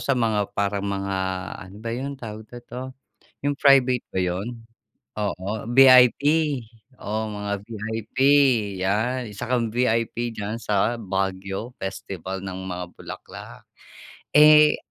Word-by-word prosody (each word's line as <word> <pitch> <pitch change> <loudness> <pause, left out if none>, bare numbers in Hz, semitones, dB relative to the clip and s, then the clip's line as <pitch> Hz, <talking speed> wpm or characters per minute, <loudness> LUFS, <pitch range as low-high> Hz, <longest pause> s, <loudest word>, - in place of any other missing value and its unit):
sa 140 - +1
mga 110 -4 +1
parang 100 0 0
mga, 100 -1 -2 0.4
ano 95 +2 -11
ba 115 +2 -6
yun, 135 +3 -4
tawag 110 -3 -8
na 120 - -11
nito, 125 - -8 0.6
yung 145 0 -1
private 130 -3 +4
ba 95 - -1
yun. 90 +4 -1 0.7
Oo, 105 +2 -3
VIP, 130 +1 +7 0.7
oo, 110 -1 -4
mga 105 -1 -4
VIP, 110 +2 -7 0.6
'yan, 110 +7 0 0.2
isa - - -6
kang 120 -2 +1
VIP, 115 0 0 0.2
diyan 105 0 -4
sa 105 +3 +1
Baguio 95 +2 -3
festival 95 -1 -6
ng 95 -1 -6
mga 90 -1 -4
bulaklak. - - -10 0.7
Eh, 150 0 +7
110 Hz, 125 wpm, -24 LUFS, 95-125 Hz, 0.7 s, VIP